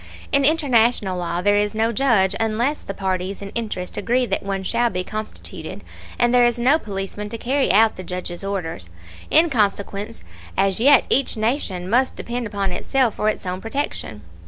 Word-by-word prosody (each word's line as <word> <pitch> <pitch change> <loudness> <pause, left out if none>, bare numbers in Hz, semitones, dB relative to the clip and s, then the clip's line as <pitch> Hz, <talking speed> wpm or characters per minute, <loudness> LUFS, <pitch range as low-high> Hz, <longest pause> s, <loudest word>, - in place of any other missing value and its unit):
In 280 0 +3
international 245 - +3
law 175 0 -2
there 205 +1 +4
is 210 +1 0
no 225 +1 +1
judge, 210 -6 +2
unless 230 +6 0
the 195 - -7
parties 190 0 -2
in 200 0 -8
interest 210 -6 -4
agree 250 +2 +1
that - - -2
one 195 -1 -3
shall 235 +5 +1
be 180 -3 -3
constituted; 215 +3 -7 0.3
and 240 0 +2
there 245 -1 +6
is 240 0 +2
no 260 +6 +3
policeman 205 -1 -5
to 230 - -5
carry 265 +4 +1
out 220 +3 +4
the 185 - -6
judge's 180 0 -5
orders. 170 - -4 0.4
In 325 +2 +5
consequence, 205 -1 -1 0.3
as 195 0 +2
yet 280 +5 +6
each 270 -3 +2
nation 215 -6 -1
must 250 +6 +2
depend 240 0 -4
upon 200 -2 -2
itself 255 +5 +1
for 215 - 0
its 215 - -4
own 185 +1 -3
protection. 225 - -4
215 Hz, 180 wpm, -21 LUFS, 195-240 Hz, 0.4 s, there